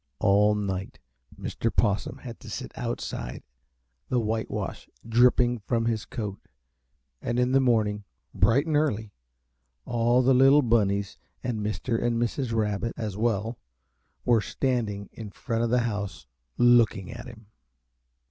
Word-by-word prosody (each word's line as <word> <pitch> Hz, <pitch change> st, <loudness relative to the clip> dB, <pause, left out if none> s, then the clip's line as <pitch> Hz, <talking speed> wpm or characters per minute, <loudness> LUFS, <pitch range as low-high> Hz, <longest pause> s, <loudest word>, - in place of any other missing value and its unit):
All 105 Hz, +1 st, +4 dB
night 95 Hz, -2 st, -3 dB, 0.4 s
Mr. 115 Hz, -, -2 dB
Possum 100 Hz, 0 st, 0 dB
had 120 Hz, -3 st, -9 dB
to -, -, -11 dB
sit -, -, -6 dB
outside, -, -, -4 dB, 0.7 s
the 125 Hz, -, +2 dB
whitewash 110 Hz, 0 st, -3 dB, 0.2 s
dripping 120 Hz, +1 st, +4 dB
from 115 Hz, +2 st, -1 dB
his 115 Hz, -2 st, -1 dB
coat, 105 Hz, -5 st, -5 dB, 0.8 s
and 120 Hz, +1 st, -2 dB
in 125 Hz, +1 st, +2 dB
the 135 Hz, -, +5 dB
morning, 110 Hz, -5 st, +2 dB, 0.3 s
bright 135 Hz, +6 st, +3 dB
and 160 Hz, -2 st, 0 dB
early, 110 Hz, -9 st, 0 dB, 0.7 s
all 120 Hz, +1 st, +2 dB
the 130 Hz, +1 st, +5 dB
little 135 Hz, +3 st, +6 dB
Bunnies 100 Hz, -4 st, +1 dB, 0.2 s
and 120 Hz, -4 st, -2 dB
Mr. 115 Hz, +2 st, -1 dB
and 120 Hz, -1 st, +1 dB
Mrs. 120 Hz, +1 st, -1 dB
Rabbit, 110 Hz, 0 st, -1 dB
as 110 Hz, -4 st, -3 dB
well, 115 Hz, +1 st, -1 dB, 0.7 s
were 120 Hz, -3 st, +4 dB
standing 110 Hz, -5 st, -2 dB
in 110 Hz, -2 st, -8 dB
front 115 Hz, +3 st, -2 dB
of 120 Hz, -, +1 dB
the 125 Hz, +1 st, +3 dB
house, 100 Hz, -, -3 dB, 0.3 s
looking 120 Hz, -4 st, +4 dB
at 120 Hz, +1 st, -8 dB
him. 115 Hz, -3 st, -12 dB
115 Hz, 140 wpm, -27 LUFS, 105-120 Hz, 0.8 s, little